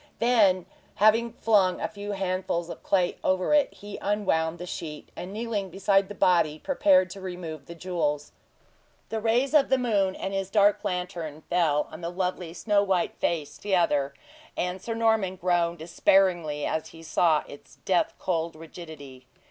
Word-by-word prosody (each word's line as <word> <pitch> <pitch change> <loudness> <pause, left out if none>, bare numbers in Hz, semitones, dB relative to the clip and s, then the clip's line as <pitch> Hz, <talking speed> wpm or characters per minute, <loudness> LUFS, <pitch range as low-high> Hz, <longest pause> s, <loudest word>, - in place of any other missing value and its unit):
Then, 210 -7 +3 0.3
having 225 +3 +3
flung 200 -5 +2
a - - -1
few 205 -1 -6
handfuls 185 -3 -2
of - - -9
clay 180 -3 +1
over 185 +8 +1
it, 295 -1 +4
he 205 0 -9
unwound 170 -6 0
the 175 - -7
sheet, 155 -4 -7
and 180 - -7
kneeling 210 -2 -3
beside 195 +1 +2
the 205 - -7
body, 170 -6 +3
prepared 185 - +3
to 195 0 -9
remove 175 -5 -7
the 170 - -9
jewels. 155 -5 -2 0.8
The 220 -1 -3
rays 240 +6 +1
of 295 -3 +5
the 265 - +4
moon 205 -6 +1
and 195 - -4
his 195 -1 -2
dark 205 0 +3
lantern 175 -4 -4
fell 160 -4 +2
on 155 - -9
the 170 - -3
lovely, 180 -1 -3
snow 205 0 +2
white 190 -3 0
face 155 -4 -2
together, 160 -8 +1 0.4
and 180 +1 -2
Sir 230 +3 -4
Norman 220 -5 +2
groaned 175 -1 +1
despairingly 170 -2 +2
as 160 - -2
he 165 0 -13
saw 160 -1 +2
its 145 - -13
death 185 -2 +1
cold 165 -3 -2
rigidity. 155 -5 -11
185 Hz, 165 wpm, -27 LUFS, 165-205 Hz, 0.8 s, of